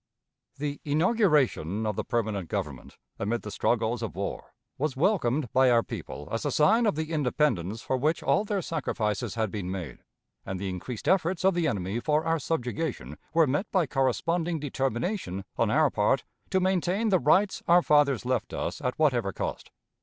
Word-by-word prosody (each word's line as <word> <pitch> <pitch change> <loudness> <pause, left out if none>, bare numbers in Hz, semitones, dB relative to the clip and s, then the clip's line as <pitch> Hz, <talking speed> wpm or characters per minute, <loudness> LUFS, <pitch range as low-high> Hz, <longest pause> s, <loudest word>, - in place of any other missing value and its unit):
The 145 0 -4
inauguration 150 - +2
of 105 -2 -1
the - - -2
permanent 110 -7 -2
government, 75 -11 -5 0.2
amid 115 +4 -1
the 105 - -6
struggles 115 +3 0
of 115 -7 -4
war, 100 +2 -5 0.2
was 145 -2 -1
welcomed 145 - +1
by 130 0 +5
our 120 -1 +4
people 75 - -7
as 115 - -2
a 145 - 0
sign 215 - +4
of 205 - +1
the 160 +1 -3
independence 125 - 0
for 130 - 0
which 155 +5 0
all 205 - +3
their 205 -3 -2
sacrifices 110 -12 -2
had 110 -3 -1
been 100 -4 -4
made, 90 -9 -5 0.4
and 95 -1 -5
the 95 0 -3
increased 100 +6 -6
efforts 185 0 +2
of 190 - +5
the 170 -2 +1
enemy 100 -1 -2
for 150 +4 +1
our 165 0 +1
subjugation 125 - -3 0.2
were 165 -1 +6
met 145 +9 -1
by 185 -4 +3
corresponding 160 - 0
determination 135 - -2
on - - +1
our - - +3
part - - +2 0.3
to 190 - +2
maintain 185 +3 +1
the 185 -3 +4
rights 185 +9 +3
our 175 +1 +6
fathers 140 -4 +3
left 125 -3 -1
us - - -3
at 125 - -2
whatever 125 -10 +2
cost. - - -5
135 Hz, 175 wpm, -27 LUFS, 110-165 Hz, 0.4 s, were